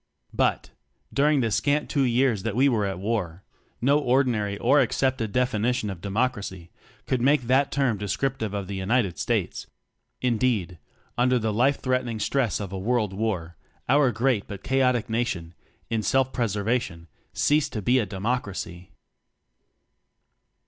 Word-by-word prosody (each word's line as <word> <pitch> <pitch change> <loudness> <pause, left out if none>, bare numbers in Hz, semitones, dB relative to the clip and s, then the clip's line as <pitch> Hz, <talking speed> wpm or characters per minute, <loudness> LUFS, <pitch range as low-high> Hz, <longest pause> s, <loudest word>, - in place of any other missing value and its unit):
But, - - 0 0.4
during 145 0 +3
the 115 -2 0
scant 145 +7 +1
two 140 - 0
years 120 -3 +2
that 105 0 -3
we 135 +3 +4
were 110 -6 +1
at 95 -1 -4
war, 95 -3 -3 0.4
no 140 +4 +4
ordinary 120 -7 +1
or 135 +7 +4
ac - - +4
cepted 130 -5 0
definition 125 -3 0
of 90 -3 -9
Democracy 100 -5 -2 0.3
could 130 -2 0
make 140 +2 +3
that 130 +4 +2
term 135 -7 +1
descriptive 110 +2 -2
of 100 -1 -3
the 100 - -6
United 95 -1 0
States; - - -1 0.5
indeed, 115 -8 0 0.4
under 125 +1 +3
the 110 -2 -1
life 130 +6 +2
threatening 125 -3 -1
stress 120 -2 0
of 100 -2 -6
a 95 - -3
World 110 -1 0
War, 95 -5 -2 0.3
our 135 0 +4
great 115 -1 0
but 100 -1 -8
chaotic 125 -4 +1
nation 105 -8 -2 0.4
in 115 -1 +1
self 130 +3 +1
preservation 105 -5 -1 0.2
ceased 150 0 +1
to 110 - -3
be 125 +6 +3
a 110 - -1
Democ 105 +6 -2
racy! 90 -2 -7
115 Hz, 150 wpm, -25 LUFS, 100-130 Hz, 0.5 s, we